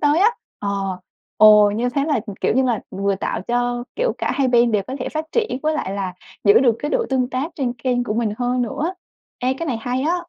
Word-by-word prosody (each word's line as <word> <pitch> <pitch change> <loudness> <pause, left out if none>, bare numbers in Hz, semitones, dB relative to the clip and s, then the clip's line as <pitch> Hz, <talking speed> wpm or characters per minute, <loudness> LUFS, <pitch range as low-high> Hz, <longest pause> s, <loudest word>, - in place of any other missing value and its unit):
tới 295 +2 +3
á, 415 +4 +6 0.3
ờ, 195 -2 -2 0.4
ồ, 210 -1 +7
như 230 +4 -1
thế 275 +3 0
là, 290 -6 +1 0.2
kiểu - - +1
như 265 - +3
là, 240 -4 0
vừa 200 +1 0
tạo 190 - -3
cho, 245 0 0
kiểu, - - +1
cả - - -1
hai 275 -2 +1
bên 240 -1 +4
đều 210 -2 +2
có 260 - -5
thể - - -2
phát 310 0 -3
triển 445 - 0
với 310 0 +1
lại 195 - -2
là 195 -2 -3 0.3
giữ 205 - +7
được 240 -4 +3
cái 295 - -3
độ 480 -2 +1
tương 255 -1 +1
tác 280 +7 -2
trên 255 -4 -1
kênh 245 0 -1
của 210 - -2
mình 225 -2 0
hơn 245 0 0
nữa. 310 - -2 0.5
Ê, 255 +1 +1
cái 330 +5 -5
này 255 -6 -1
hay 250 +2 -2
á! 330 +4 +1
245 Hz, 245 wpm, -21 LUFS, 215-280 Hz, 0.5 s, ồ